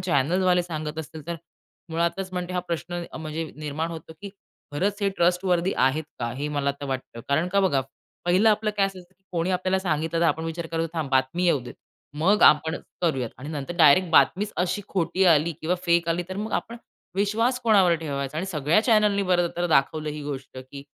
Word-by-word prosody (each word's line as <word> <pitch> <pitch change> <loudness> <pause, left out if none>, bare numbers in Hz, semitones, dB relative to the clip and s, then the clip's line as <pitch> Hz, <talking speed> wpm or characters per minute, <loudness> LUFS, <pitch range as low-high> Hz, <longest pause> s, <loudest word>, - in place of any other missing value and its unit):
चॅनेलवाले 180 +3 +2
सांगत 155 -2 -5
असतील, 160 -1 -8
तर 170 0 -3 0.5
मुळातच 170 +3 -1
म्हणते 180 0 -4
हा 180 - 0
प्रश्न 175 0 -4 0.5
निर्माण 155 +2 -3
होतो, 160 -1 -8
की 200 - -5 0.4
खरंच 195 +8 0
हे 200 - +2
ट्रस्टवर्थी 180 +1 +2
आहेत 135 +5 +2
का? 120 -1 -2
हे 140 +4 -4
मला 145 -1 0
तर 140 - -4
वाटतं. 130 -3 -5
कारण 155 +5 +1
का 200 +2 +2
बघा, 150 -9 +2 0.4
पहिलं 185 +5 +4
आपलं 215 0 +2
काय 195 -1 +3
असतं, 195 -1 -8
की 185 +1 -23
कोणी 170 +1 0
आपल्याला 185 +1 +1
सांगितलं, 165 -2 -1
तर - - +3
आपण 160 0 0
विचार 165 +1 -4
करतो 165 0 0
थांब 155 -4 -3
बातमी 135 +7 +1
येऊ 170 -6 +3
देत. 125 - -10 0.4
मग 195 +7 +3
आपण 160 +2 +5 0.3
करूयात. 135 -9 0
आणि 140 +3 -8
नंतर 150 +1 -5
डायरेक्ट 170 +2 +6
बातमीच 200 +5 +3
अशी 180 +4 -1
खोटी 180 0 0
आली 165 -1 +4
किंवा 170 +3 0
फेक 170 -1 +3
आली, 170 +1 0
तर 190 - -5
मग 210 +2 -4
आपण 235 - -2 0.4
विश्वास 220 +6 +1
कोणावर 200 -7 +4
ठेवायचा? 140 -2 -4
आणि 175 +4 -2
सगळ्या 155 +1 +2
चॅनेलनी 210 -3 +3
बर 180 -2 +2
तर 175 0 0
दाखवलं 155 0 +1
ही 150 0 -6
गोष्ट, 135 -2 -6
की 130 +2 -10
170 Hz, 190 wpm, -25 LUFS, 150-185 Hz, 0.5 s, डायरेक्ट